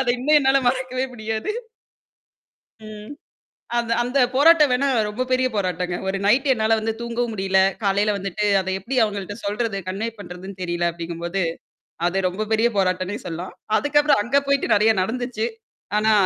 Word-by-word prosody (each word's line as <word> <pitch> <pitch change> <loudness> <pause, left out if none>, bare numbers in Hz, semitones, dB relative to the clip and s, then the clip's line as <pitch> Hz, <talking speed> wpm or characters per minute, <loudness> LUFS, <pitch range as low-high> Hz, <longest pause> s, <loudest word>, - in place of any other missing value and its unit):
அத 265 - -1
இன்னும் 300 +4 +4
என்னால 270 0 +3
மறக்கவே 255 0 -1
முடியாது. 220 - -3 1.3
ம். 215 +3 -9 0.7
அந்த 230 -1 -1
அந்த 250 +3 -1
போராட்டம் 300 +2 +6
வேணா 250 +3 +2 0.2
ரொம்ப 210 +5 -3
பெரிய 255 0 +2
போராட்டங்க. 180 -2 -1
ஒரு 195 - 0
நைட் 255 +8 +3
என்னால 225 -2 +2
வந்து 225 +1 -1
தூங்கவும் 235 0 -2
முடியல. 190 -1 +1 0.2
காலையில 205 +1 +2
வந்துட்டு 195 +1 -3 0.2
அத 190 - -5
எப்பிடி 240 +8 -5
அவுங்கள்ட்ட 205 -2 -2
சொல்றது, 205 0 -2
கன்வே 200 +5 -2
பண்றதுன்னு 185 0 -9
தெரியல 175 -1 0
அப்டிங்கம்போது. 170 +2 -4 0.7
அது 190 +2 0
ரொம்ப 195 +4 -3
பெரிய 225 +2 +3
போராட்டம்னே 185 +2 0
சொல்லலாம். 175 +1 -6 0.2
அதுக்கப்புறம் 290 0 +3
அங்க 275 +5 +2
போயிட்டு 280 0 +1
நெறையா 215 +1 +4
நடந்துச்சு. 230 +1 -2 0.5
ஆனா 215 +1 +3
215 Hz, 150 wpm, -22 LUFS, 190-250 Hz, 1.3 s, போராட்டம்